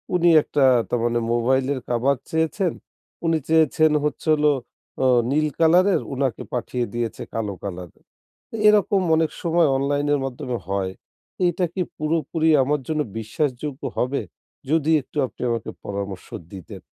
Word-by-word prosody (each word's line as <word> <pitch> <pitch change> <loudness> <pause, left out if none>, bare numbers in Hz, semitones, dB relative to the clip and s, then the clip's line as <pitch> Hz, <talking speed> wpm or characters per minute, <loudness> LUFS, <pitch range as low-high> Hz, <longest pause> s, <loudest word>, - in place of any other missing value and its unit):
উনি 175 -1 +4
একটা 145 -2 +2 0.2
তারমানে 120 0 0
মোবাইলের 130 +3 +1
কাভার 125 +3 +2
চেয়েছেন। 160 +3 0 0.5
উনি 165 -1 +3
চেয়েছেন 155 -1 +4
হচ্ছে 150 - -3
হল 150 0 0 0.6
ও - - +3 0.3
নীল 155 +2 +2
কালারের, 180 +4 +4
উনাকে 130 -3 -1
পাঠিয়ে 125 0 -2
দিয়েছে 120 -2 -3
কালো 105 -3 -2
কালারের। 90 -4 -8 0.5
তো - - -8
এরকম 205 -2 +3
অনেক 160 -1 +1
সময় 170 -2 +3
অনলাইন 145 +1 0
এর 145 - +2
মাধ্যমে 125 -1 -4
হয়। 95 -1 -1 0.5
এইটা 175 +1 +1
কি 190 - -2 0.2
পুরোপুরি 160 +1 0
আমার 145 +2 0
জন্য 155 -1 0 0.2
বিশ্বাসযোগ্য 135 +4 -3
হবে? 130 +3 0 0.5
যদি 160 0 +2
একটু 140 - -12
আপনি - - -15
আমাকে 115 -2 -2 0.2
পরামর্শ 100 -2 -5 0.3
দিতেন? 95 -3 -9
140 Hz, 140 wpm, -23 LUFS, 120-160 Hz, 0.6 s, উনি